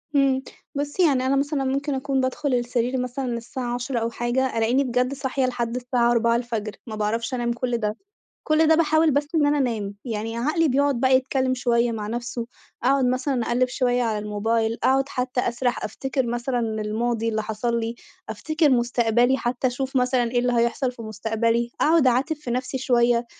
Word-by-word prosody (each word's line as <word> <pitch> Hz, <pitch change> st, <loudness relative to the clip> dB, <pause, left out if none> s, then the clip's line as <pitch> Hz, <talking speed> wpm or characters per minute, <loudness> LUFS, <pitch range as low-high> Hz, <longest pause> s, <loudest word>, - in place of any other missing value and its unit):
امم، 270 Hz, -1 st, +3 dB, 0.3 s
بُصي 290 Hz, +5 st, 0 dB
يعني 265 Hz, -4 st, +2 dB
أنا 265 Hz, +1 st, +2 dB
مثلًا 280 Hz, 0 st, 0 dB
ممكن 275 Hz, +2 st, -1 dB
أكون 270 Hz, 0 st, 0 dB
بادخل 260 Hz, +2 st, -1 dB
السرير 245 Hz, +1 st, 0 dB
مثلًا 250 Hz, +2 st, -3 dB
الساعة 240 Hz, +1 st, -5 dB
22:00 245 Hz, 0 st, -2 dB
أو 230 Hz, 0 st, -1 dB
حاجة، 240 Hz, +2 st, -1 dB
ألاقيني 235 Hz, +5 st, +2 dB
بجد 250 Hz, +1 st, 0 dB
صاحية 270 Hz, -1 st, -1 dB
لحد 240 Hz, -2 st, -2 dB
الساعة 245 Hz, -1 st, +1 dB
04:00 235 Hz, -2 st, 0 dB, 0.2 s
ما 220 Hz, -, -5 dB
باعرفش 225 Hz, +3 st, -2 dB
أنام 240 Hz, -1 st, 0 dB
كُلّ 240 Hz, 0 st, -1 dB
ده، 215 Hz, -1 st, -2 dB, 0.5 s
كُلّ 310 Hz, +1 st, +4 dB
ده 320 Hz, -, +6 dB
باحاول 315 Hz, 0 st, +3 dB
بس 290 Hz, +1 st, +1 dB
إن 305 Hz, -3 st, +3 dB
أنا 290 Hz, 0 st, +2 dB
أنام، 220 Hz, -7 st, -1 dB
يعني 225 Hz, -1 st, -4 dB
عقلي 305 Hz, +7 st, +1 dB
بيقعُد 280 Hz, -1 st, +1 dB
بقى 260 Hz, 0 st, +5 dB
يتكلم 260 Hz, 0 st, 0 dB
شوية 240 Hz, -2 st, +1 dB
مع 215 Hz, -2 st, -4 dB
نفسُه، 235 Hz, +1 st, -4 dB, 0.4 s
أقعُد 270 Hz, +1 st, +3 dB
مثلًا 255 Hz, 0 st, 0 dB
أقلِّب 250 Hz, +1 st, +1 dB
شوية 250 Hz, -1 st, +1 dB
على 220 Hz, -3 st, 0 dB
الموبايل، 220 Hz, +2 st, -1 dB
أقعُد 270 Hz, +1 st, +3 dB
حتى 250 Hz, -2 st, -1 dB
أسرح، 245 Hz, +1 st, -1 dB
أفتكِّر 265 Hz, -1 st, -2 dB
مثلًا 240 Hz, +2 st, -2 dB
الماضي 225 Hz, +1 st, -1 dB
اللي 220 Hz, -1 st, -1 dB
حصل 225 Hz, +2 st, -1 dB
لي، 225 Hz, +1 st, -3 dB, 0.3 s
أفتكِّر 310 Hz, -2 st, +1 dB
مُستقبلي 240 Hz, +1 st, +2 dB
حتى 250 Hz, +1 st, -1 dB
أشوف 265 Hz, +2 st, -2 dB
مثلًا 250 Hz, -2 st, +2 dB
إيه 245 Hz, -, +1 dB
اللي 245 Hz, 0 st, +1 dB
هيحصل 235 Hz, +2 st, +1 dB
في 235 Hz, -2 st, -10 dB
مُستقبلي، 225 Hz, +2 st, -1 dB
أقعد 315 Hz, -3 st, +4 dB
أعاتب 260 Hz, +6 st, +2 dB
في 295 Hz, -5 st, -7 dB
نفسي 255 Hz, +2 st, -2 dB
شوية، 240 Hz, -2 st, +2 dB
245 Hz, 180 wpm, -24 LUFS, 235-265 Hz, 0.5 s, ده